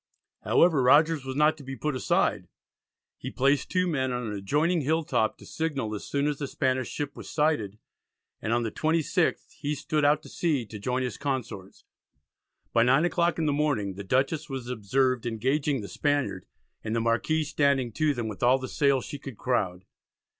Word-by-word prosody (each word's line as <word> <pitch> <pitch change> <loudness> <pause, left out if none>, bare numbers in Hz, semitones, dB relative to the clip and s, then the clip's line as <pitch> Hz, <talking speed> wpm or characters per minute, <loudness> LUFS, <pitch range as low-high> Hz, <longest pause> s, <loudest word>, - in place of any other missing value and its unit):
However, 165 -6 +4
Rogers 145 +3 +4
was 130 0 -4
not 150 +2 +3
to 145 - -11
be 135 0 -6
put 150 +3 -2
aside. 130 - +1 0.7
He - - -5
placed 135 +1 +1
two 180 0 +1
men 135 -7 0
on 125 -1 -2
an 105 - -4
adjoining 150 - +1
hilltop 150 -6 0
to - - -14
signal 140 -9 -3
as 105 - -6
soon 140 0 0
as 150 -1 -1
the 140 - -3
Spanish 130 -1 -1
ship 145 -1 -4
was - - -9
sighted, 150 -10 0 0.6
and 110 - -2
on 120 0 +2
the 110 - -2
26th 160 0 0
he 145 +1 -2
stood 150 +1 -1
out 150 +1 +3
to - - -11
sea 150 -8 0
to 105 -1 -9
join 125 +5 -1
his 125 - -4
consorts. 125 -9 -4 0.9
By 115 - +4
9 135 +7 +4
o'clock 175 -1 +1
in 160 - 0
the 145 - +2
morning 140 -10 0
the 100 +2 -7
Dutchess 135 - 0
was 130 -3 -5
observed 125 +2 0
engaging 135 +4 0
the 100 - -7
Spaniard, 145 - -1 0.4
and 110 +1 -2
the - - +2
Marquis 115 +8 +1
"standing 140 -4 +1
to 150 +4 +1
them 120 -2 -3
with 105 -4 -7
all 125 +2 +5
the 130 0 -6
sail 140 0 +2
she 145 - -7
could 135 -5 -9
crowd." 95 -8 -1
135 Hz, 190 wpm, -27 LUFS, 120-150 Hz, 0.9 s, all